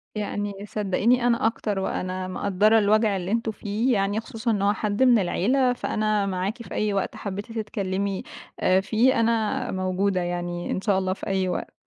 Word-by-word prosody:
يعني 205 -1 -3
صدقيني 220 +5 +1
أنا 235 -2 +2
أكتر، 210 -3 -2
وأنا 185 -1 -3
مقدرة 200 +4 +3
الوجع 215 0 +3
اللي 180 +1 -4
أنتم 230 0 0
فيه، 215 +4 -1
يعني 200 0 +1
خصوصًا 225 +1 -3
إن 205 -3 0
هو 200 +1 +3
حد 210 +3 0
من 245 -3 +6
العيلة، 245 +8 +2
فأنا 215 -3 0
معاكِ 195 +3 -2
في - - -10
أي 210 -1 0
وقت 195 -1 -1
حبيتِ 200 +2 -6
تتكلمي 200 -3 -2 0.6
فيه 230 +5 +2
أنا 225 -2 +1
موجودة 185 0 0
يعني، 175 0 -3
إن - - -1
شاء 200 -2 +2
الله 185 0 -1
في - - -8
أي 190 -1 0
وقت. 180 - -4
205 Hz, 170 wpm, -25 LUFS, 190-225 Hz, 0.6 s, من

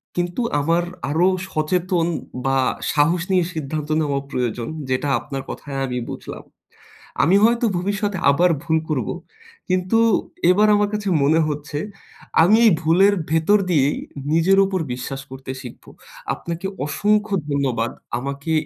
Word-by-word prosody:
কিন্তু 175 +5 -1 0.2
আমার 165 +4 +1 0.3
আরো 165 +5 +3 0.2
সচেতন 170 +2 0 0.4
বা 135 0 +2 0.4
সাহস 165 +4 +2
নিয়ে 180 -2 +3
সিদ্ধান্ত 155 -1 -4
নেওয়া 140 -2 0
প্রয়োজন 120 -2 -2 0.2
যেটা 130 +3 0
আপনার 135 -2 -6
কথায় 140 -2 -6
আমি 125 -1 -3
বুঝলাম। - - -8 0.8
আমি 180 +6 +4
হয়তো 235 +1 +3
ভবিষ্যতে 205 +2 -2
আবার 175 +6 +3
ভুল 165 -1 +1
করব। 140 -7 -1 0.6
কিন্তু 185 +4 +1 0.5
এবার 210 +4 +4
আমার 205 0 +2
কাছে 210 -1 -2
মনে 155 +4 +4
হচ্ছে 145 -1 -4 0.6
আমি 195 +6 +5
এই 215 - +7
ভুলের 180 +6 +4 0.2
ভেতর 160 +6 +3
দিয়েই 145 -4 +2 0.4
নিজের 170 +4 +4
উপর 190 -1 -1
বিশ্বাস 130 +2 -5
করতে 130 0 -8
শিখব। 125 - -11 0.5
আপনাকে 170 +2 -5 0.2
অসংখ্য 210 +7 +1
ধন্যবাদ 130 -5 0 0.3
আমাকে 140 +4 -4
160 Hz, 130 wpm, -21 LUFS, 140-185 Hz, 0.8 s, এই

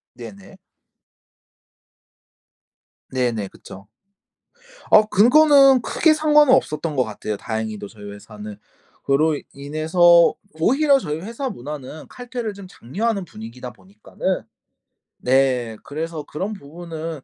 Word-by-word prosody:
네네. 100 -5 -12 2.5
네네. 120 -5 -1
그쵸. 95 +1 -14 1.0
아 215 - +8
그거는 275 +3 +6
크게 320 +6 +2
상관은 300 -3 +5
없었던 155 - -1
것 130 - +2
같아요, 110 -1 -5
다행히도 110 -1 -5
저희 105 -1 -14
회사는. 105 0 -10 0.5
그로 150 +2 +2 0.2
인해서 160 +4 +3 0.3
오히려 275 - +4
저희 150 - -4
회사 230 +8 -5
문화는 150 - -8
칼퇴를 245 -3 -6
좀 200 -1 -11
장려하는 200 - -3
분위기다 125 -4 -10
보니까는 100 +1 -5 0.7
네, 125 -3 +1
그래서 160 +1 -5
그런 190 +9 -5
부분은 165 -2 -8
155 Hz, 245 characters per minute, -21 LUFS, -, 2.5 s, 아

